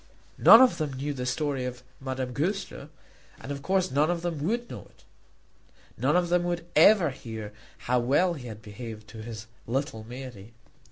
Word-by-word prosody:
None 230 - +10
of 255 - +2
them 150 -3 -2
knew 140 +3 -3
the 125 -2 -4
story 140 0 -1
of 125 0 -6 0.2
Madame 130 -1 -4
Goesler, 175 -1 -3 0.5
and 145 - -7
of 140 0 -5
course 185 +3 +1
none 145 +4 +2
of 175 -1 -1
them 165 -4 -3
would 235 +7 -1
know - - -9
it. - - -26 0.9
None - - +1
of 175 -1 +2
them 175 0 +2
would 175 -1 -2
ever 170 -1 +6
hear 110 -4 -8 0.2
how 125 +1 0
well 145 +9 +2
he 135 -6 -8
had 110 -2 -9
behaved 110 0 -9
to 110 +1 -9
his 110 0 -7 0.2
little 120 -2 -2
Mary. 120 -3 -9
135 Hz, 180 wpm, -27 LUFS, 120-170 Hz, 0.9 s, None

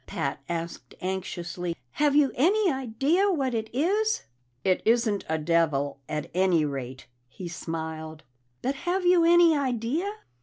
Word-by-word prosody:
Pat 140 +1 -3
asked 170 0 -5
anxiously. 180 -2 -4 0.2
"Have 290 -1 +2
you 290 -3 +5
any 380 - +3
idea 270 - +1
what 270 -7 0
it 220 -1 -2
is?" 410 - +1 0.4
"It 185 -1 +2
isn't 225 -3 +2
a 160 - +1
devil, 150 -3 +1
at 150 - -4
any 180 -3 +3
rate," 130 -2 -5 0.2
he 175 +8 -8
smiled. 160 -2 -6 0.4
"But 265 - +1
have 350 +6 -2
you 355 -1 +5
any 340 -1 +6
idea?" 275 - -1
220 Hz, 140 wpm, -27 LUFS, -, 0.4 s, any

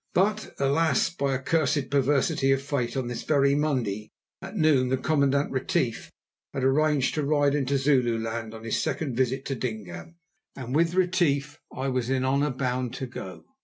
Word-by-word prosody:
But, 210 +4 +1
alas! 140 +1 +2
by 140 -5 -1
a - - -2
cursed 140 -1 0
perversity 140 0 +2
of 135 0 +1
fate, 135 -3 -2
on 130 -2 -2
this 120 -1 -4
very 140 -2 +3
Monday 125 -9 -1 0.3
at 210 - -7
noon 145 -6 +3
the 130 - +1
Commandant 140 0 +1
Retief 135 -3 -1 0.5
had 135 - -2
arranged 145 0 +2
to 155 - -1
ride 145 -1 +2
into 140 -1 +1
Zululand 115 -5 0
on 110 - -10
his 115 - -1
second 140 -7 -2
visit 130 +2 0
to 135 - -2
Dingaan, 110 - -6 0.4
and 130 0 -5
with 165 +2 +2
Retief 165 -6 +1
I 135 +1 -3
was 125 -2 -1
in 130 -1 +1
honour 140 +3 +2
bound 125 -1 -2
to 130 - -4
go. 95 -7 -9
135 Hz, 170 wpm, -26 LUFS, 125-150 Hz, 0.5 s, very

